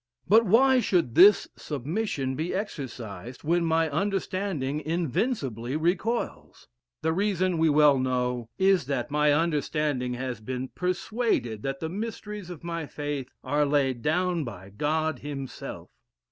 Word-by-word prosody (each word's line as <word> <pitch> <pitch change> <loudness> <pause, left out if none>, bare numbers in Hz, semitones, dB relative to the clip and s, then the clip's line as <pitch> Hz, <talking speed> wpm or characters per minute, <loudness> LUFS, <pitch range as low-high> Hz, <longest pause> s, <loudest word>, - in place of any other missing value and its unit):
But 225 +5 +6
why 260 +6 +5
should 180 - +1
this 200 - +7
submission 145 - -2
be 160 +6 -2
exercised 125 - -6
when 170 +3 +2
my 165 0 +2
understanding 185 -3 -1
invincibly 150 - -1
recoils? 180 +9 -2 0.4
The 160 - +2
reason, 185 -2 +1
we 160 0 +4
well 145 -2 +5
know, 125 -2 -1
is, 190 -7 +3
that 135 -2 -2
my 150 0 +3
understanding 145 -4 0
has 125 -2 -4
been 130 +3 -4
persuaded 180 - -1
that 135 +2 -4
the 160 - -2
mysteries 210 -1 -5
of 175 -3 -9
my 165 -2 -4
faith 145 -3 -4
are 145 +3 +1
laid 140 -4 +1
down 175 +3 +1
by 100 -6 -8
God 155 +5 -1
himself. 135 -2 -7
150 Hz, 130 wpm, -27 LUFS, 130-180 Hz, 0.4 s, this